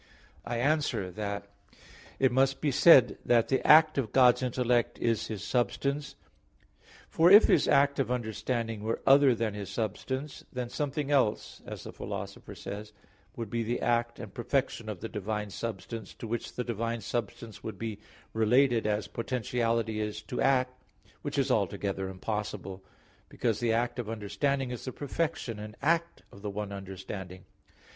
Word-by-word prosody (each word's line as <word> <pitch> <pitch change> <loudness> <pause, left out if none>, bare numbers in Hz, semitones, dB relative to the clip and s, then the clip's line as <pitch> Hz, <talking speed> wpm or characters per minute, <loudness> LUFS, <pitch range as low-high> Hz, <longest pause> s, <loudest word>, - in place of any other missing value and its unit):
I 120 0 -2
answer 140 -8 0
that, 100 +1 -4 0.7
It 130 -1 +3
must 135 +2 +2
be 150 - +1
said 140 0 +7
that 120 -2 +3
the 130 - +2
act 155 -1 +7
of 115 -6 -2
God's 125 -1 +5
intellect 125 -1 +1
is 115 -2 0
His 105 -5 -5
substance. 140 +5 -1 0.9
For 165 +2 +4
if 205 +3 +10
His - - +4
act 140 0 +4
of 130 -4 0
understanding 115 -1 -2
were 110 +2 -2
other 135 -2 +6
than 110 -2 -1
His 100 -3 -6
substance, 125 +7 -4
then 125 -2 -4
something 145 +1 -2
else, 130 -7 +1
as - - -7
the - - -8
Philosopher - - -7
says 105 +1 -7
(Metaph. 105 - -23
xii), 95 - -30 0.3
would 115 -2 -5
be 120 -1 0
the 120 +2 -1
act 120 0 0
and 110 -4 -9
perfection 120 -2 -1
of 105 -4 -6
the 115 - -3
divine 105 -1 -4
substance, 115 +2 -6
to - - -8
which 115 +1 -4
the 125 - -2
divine 115 0 -2
substance 115 -1 -5
would 110 -3 -6
be 110 0 -5 0.3
related, 115 +1 +3
as 105 0 0
potentiality 115 -2 -1
is 105 0 -4
to 125 - -4
act, 130 -1 +2 0.4
which - - -4
is - - +2
altogether 95 -1 -1
impossible; 100 -1 -5 0.5
because 115 -4 -1
the 115 -2 +1
act 120 +1 0
of 115 -3 -4
understanding 125 +5 -1
is 125 - -6
the 130 - -3
perfection 140 -5 -3
and 105 0 -8
act 170 +2 0
of 100 - -14
the 105 - -4
one 100 0 -4
understanding. 95 -1 -7
115 Hz, 165 wpm, -29 LUFS, 105-130 Hz, 0.9 s, if